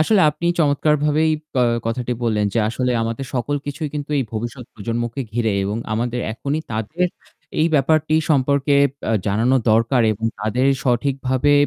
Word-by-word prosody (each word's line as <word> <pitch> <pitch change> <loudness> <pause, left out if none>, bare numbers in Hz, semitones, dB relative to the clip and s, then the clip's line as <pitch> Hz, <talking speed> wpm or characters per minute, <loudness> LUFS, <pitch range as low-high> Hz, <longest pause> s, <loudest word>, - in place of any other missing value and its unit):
আসলে 195 +5 +4
আপনি 165 +3 -4
পা 175 - 0
চমৎকারভাবেই 150 +1 +2 0.3
আ - - +4 0.2
কথাটি 125 +1 -2
বললেন 110 -3 +1
যে - - +2
আসলে 125 +2 -1
আমাদের 115 +4 -3
সকল 130 +4 0
কিছুই 150 +2 -3
কিন্তু 145 0 -4
এই 135 - +1
ভবিষ্যৎ 120 +3 -5
প্রজন্মকে 120 +4 -3
ঘিরে 115 -2 0
এবং 105 +2 -2 0.2
আমাদের 120 +2 -1
এখনই 140 +6 -2
তাদের 135 - -1 0.5
এই 160 - +4
ব্যাপারটি 155 +2 +2 0.2
সম্পর্কে 140 0 +2 0.3
ব্যা - - -3 0.2
জানানো 115 +6 +2
দরকার 115 +3 +3
এবং 110 +2 -6 0.2
তাদের 120 +5 +1 0.2
সঠিকভাবে 130 +2 +1
130 Hz, 155 wpm, -21 LUFS, 115-145 Hz, 0.5 s, আসলে